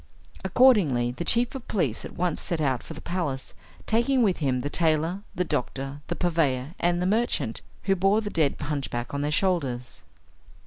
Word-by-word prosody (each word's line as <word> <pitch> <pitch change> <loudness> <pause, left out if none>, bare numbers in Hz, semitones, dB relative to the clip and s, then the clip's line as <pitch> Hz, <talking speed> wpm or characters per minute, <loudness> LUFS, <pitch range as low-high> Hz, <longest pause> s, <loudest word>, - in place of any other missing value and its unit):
Accordingly, 190 - +4
the 130 - -5
chief 235 +7 +3
of 265 -3 -8
police 150 - -1
at - - -8
once 175 -2 -1
set 170 - -2
out 135 -5 +1
for 160 - -9
the - - -9
palace, 160 -7 -3 0.3
taking 240 +3 +2
with 195 -5 +2
him 130 -4 0
the 145 - -3
tailor, 165 +3 +1
the 180 - +1
doctor, 135 -2 -3
the 175 - -2
purveyor, 155 -6 0
and 175 0 +2
the 180 - 0
merchant, 190 - 0 0.2
who 195 0 +2
bore 195 +3 +3
the 205 -1 -4
dead 155 -4 +2
hunchback 135 -4 -3
on 140 - -1
their 145 - 0
shoulders. 145 -8 -1
165 Hz, 180 wpm, -26 LUFS, 135-190 Hz, 0.3 s, Accordingly